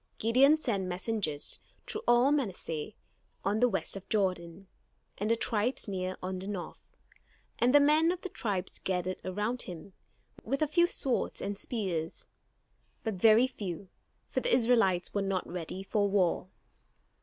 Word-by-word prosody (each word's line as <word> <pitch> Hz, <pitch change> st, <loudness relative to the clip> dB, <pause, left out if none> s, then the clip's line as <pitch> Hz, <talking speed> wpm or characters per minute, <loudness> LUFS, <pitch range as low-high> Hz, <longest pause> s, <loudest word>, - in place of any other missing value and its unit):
Gideon 265 Hz, +7 st, +5 dB
sent 210 Hz, -11 st, -1 dB
messengers 180 Hz, -4 st, -2 dB, 0.3 s
through 430 Hz, -, -4 dB
all 240 Hz, +3 st, +5 dB
Manasseh 195 Hz, -, -2 dB, 0.5 s
on 205 Hz, +2 st, +1 dB
the 245 Hz, +1 st, +4 dB
west 195 Hz, -2 st, -2 dB
of 195 Hz, -1 st, -9 dB
Jordan, 185 Hz, -3 st, -1 dB, 0.5 s
and 210 Hz, +2 st, -1 dB
the 230 Hz, -, +4 dB
tribes 230 Hz, +2 st, 0 dB
near 185 Hz, -2 st, -3 dB
on 185 Hz, 0 st, -3 dB
the 190 Hz, -, -7 dB
north; 195 Hz, -4 st, -7 dB, 0.6 s
and 245 Hz, -, +4 dB
the 290 Hz, -, +7 dB
men 305 Hz, +3 st, +4 dB
of 365 Hz, 0 st, -4 dB
the 380 Hz, -, -5 dB
tribes 200 Hz, -, -3 dB
gathered 185 Hz, 0 st, -2 dB
around 210 Hz, +6 st, -1 dB
him, 180 Hz, +2 st, -8 dB, 0.5 s
with 275 Hz, +3 st, 0 dB
a -, -, +1 dB
few 345 Hz, +3 st, +4 dB
swords 270 Hz, -7 st, -1 dB
and 200 Hz, +1 st, -3 dB
spears, 185 Hz, -7 st, -3 dB, 0.8 s
but 220 Hz, -, -1 dB
very 220 Hz, +5 st, +6 dB
few, 195 Hz, -7 st, -6 dB, 0.4 s
for -, -, -1 dB
the -, -, 0 dB
Israelites 225 Hz, -, +3 dB
were 200 Hz, -, 0 dB
not 195 Hz, -2 st, -1 dB
ready 180 Hz, +2 st, -5 dB
for 205 Hz, 0 st, +1 dB
war. 185 Hz, -2 st, +1 dB
205 Hz, 155 wpm, -30 LUFS, 185-245 Hz, 0.8 s, the